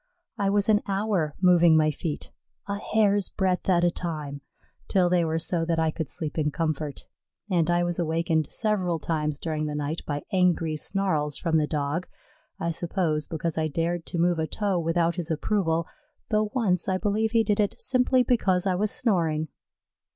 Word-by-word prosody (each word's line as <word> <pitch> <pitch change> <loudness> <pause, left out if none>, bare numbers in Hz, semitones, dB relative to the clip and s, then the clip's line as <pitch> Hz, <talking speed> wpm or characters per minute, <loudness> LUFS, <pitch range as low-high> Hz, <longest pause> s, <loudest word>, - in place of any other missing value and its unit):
I 200 -3 0
was 200 0 +2
an 215 -1 +4
hour 195 -6 0
moving 175 -3 +6
my 155 -1 +3
feet 150 +1 -5 0.4
a 200 0 -3
hair's 205 -2 +2
breadth 190 -1 -1
at 175 -2 +3
a 175 - +4
time 150 -5 -5 0.5
till 180 -2 +2
they 180 -1 +3
were 160 0 0
so 165 +1 -1
that 165 0 0
I 160 -1 +2
could 160 -2 -4
sleep 160 -3 -3
in 150 -1 +1
comfort; 155 -2 -3 0.5
and 170 -2 +2
I 175 0 +2
was 175 0 -2
awakened 165 -1 0
several 190 -6 0
times 150 -2 -2
during 155 -2 -2
the 150 - -4
night 150 +2 -3
by 145 -1 -3
angry 175 -4 +2
snarls 155 -4 0
from 165 -2 +1
the 150 -1 +1
Dog 150 +4 -2 0.5
I 170 - -1
suppose 165 -3 -1
because 160 0 -2
I 155 - +1
dared 165 +2 -2
to - - -4
move 170 0 +2
a 160 - 0
toe 200 -2 -1
without 170 +1 0
his 175 -1 -4
approval, 165 0 0 0.4
though 215 -1 +1
once 195 -8 +2
I 185 - +1
believe 215 +3 0
he 225 -1 +4
did 210 -1 0
it 205 -1 0
simply 255 0 +3
because 195 -7 +1
I 190 - +2
was 205 +4 0
snoring. 165 - 0
170 Hz, 185 wpm, -26 LUFS, 160-195 Hz, 0.5 s, moving